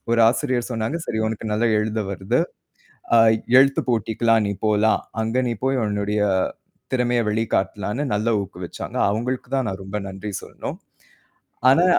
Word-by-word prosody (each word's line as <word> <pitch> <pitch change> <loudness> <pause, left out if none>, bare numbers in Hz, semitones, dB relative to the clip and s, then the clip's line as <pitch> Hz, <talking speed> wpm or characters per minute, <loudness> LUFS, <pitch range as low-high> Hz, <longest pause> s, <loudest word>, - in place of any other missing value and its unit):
ஒரு 115 0 +3
ஆசிரியர் 125 -1 0
சொன்னாங்க. 115 +7 -2
சரி, 110 - -2
உனக்கு 110 0 -4
நல்லா 110 +3 +2
எழுத 110 +1 -1
வருது. 100 - 0 0.7
ஆ - - +7 0.4
எழுத்துப்போட்டிக்கு 120 -4 +2
எல்லாம் 115 -1 +5
நீ 100 - 0
போலாம். 105 +1 +3 0.2
அங்க 115 +2 -1
நீ 120 - 0
போய் 135 -1 +1
உன்னுடைய 105 0 -1 0.7
திறமைய 125 -1 +2
வெளிக்காட்டலாம்னு 105 +2 -1
நல்ல 110 +3 0
ஊக்கு 95 -2 -10
வச்சாங்க. - - -7
அவங்களுக்கு 125 +4 -2
தான் 130 - 0
நான் 95 0 -5
ரொம்ப 95 +2 -4
நன்றி 95 +2 -6
சொல்லணும். - - -7 0.9
ஆனா 170 +6 +5
110 Hz, 145 wpm, -22 LUFS, 105-120 Hz, 0.9 s, ஆ